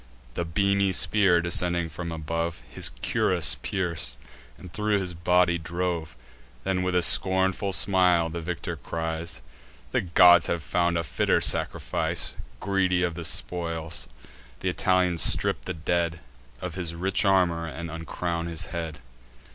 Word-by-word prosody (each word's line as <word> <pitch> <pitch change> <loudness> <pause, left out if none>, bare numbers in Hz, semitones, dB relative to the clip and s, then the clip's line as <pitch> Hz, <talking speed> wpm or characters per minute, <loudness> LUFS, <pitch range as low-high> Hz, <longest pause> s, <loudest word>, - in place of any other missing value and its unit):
The 85 - -3
beamy 100 +3 +1
spear, 95 -3 +3
descending 85 0 +1
from 85 +2 -7
above, 80 +1 -4
His - - 0
cuirass - - +3
pierc'd, 85 -9 -2 0.4
and 90 -3 -13
thro' 105 -1 0
his 95 -2 -4
body 85 0 +2
drove. 85 0 -3 0.5
Then, 95 -1 -1
with 90 0 -1
a 90 - +3
scornful 95 +3 +3
smile, 90 -3 +3
the 85 +1 -6
victor 85 0 -4
cries: 80 -2 -4 0.5
"The - - +1
gods 90 0 +6
have 85 -2 -2
found 85 +1 0
a 85 - -1
fitter 60 -5 +1
sacrifice." - - +1 0.3
Greedy 95 -2 +1
of 85 -1 -1
spoils, 85 0 -2 0.5
th' - - -9
Italians 90 -3 +1
strip - - +4
the - - -3
dead 85 +1 -1 0.4
Of - - -5
his 85 -3 -4
rich 95 +5 0
armour, 90 -4 +2
and 85 +1 -7
uncrown 85 +1 -4
his 85 +1 -4
head. 80 -3 -4
85 Hz, 140 wpm, -26 LUFS, 85-90 Hz, 0.5 s, gods